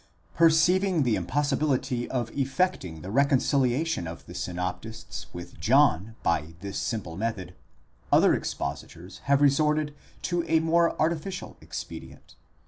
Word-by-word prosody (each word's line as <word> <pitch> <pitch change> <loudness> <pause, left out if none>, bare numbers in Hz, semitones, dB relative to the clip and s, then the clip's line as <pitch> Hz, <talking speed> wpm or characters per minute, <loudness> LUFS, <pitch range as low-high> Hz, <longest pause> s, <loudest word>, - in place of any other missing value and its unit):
® - - -32 0.3
Perceiving 170 +1 +4
the 120 -4 +2
impossibility 135 -3 0
of 120 -3 -2
effecting 135 - -1
the 95 - -6
reconciliation 140 - +2
of 85 +1 -8
the - - -10
synoptists 90 +5 -5
'with 85 0 -9
John 95 +8 +3
by 80 -1 0
this 100 0 -5
simple 95 -8 -3
method, 100 -4 -3 0.6
other - - +6
expositors 80 +6 -5
have 140 +1 +3
resorted 150 +1 +2 0.3
to 175 -1 0
a 160 0 +3
more 165 +1 +2
artificial 170 +4 -2
expedient. - - -9
130 Hz, 125 wpm, -27 LUFS, 95-155 Hz, 0.6 s, other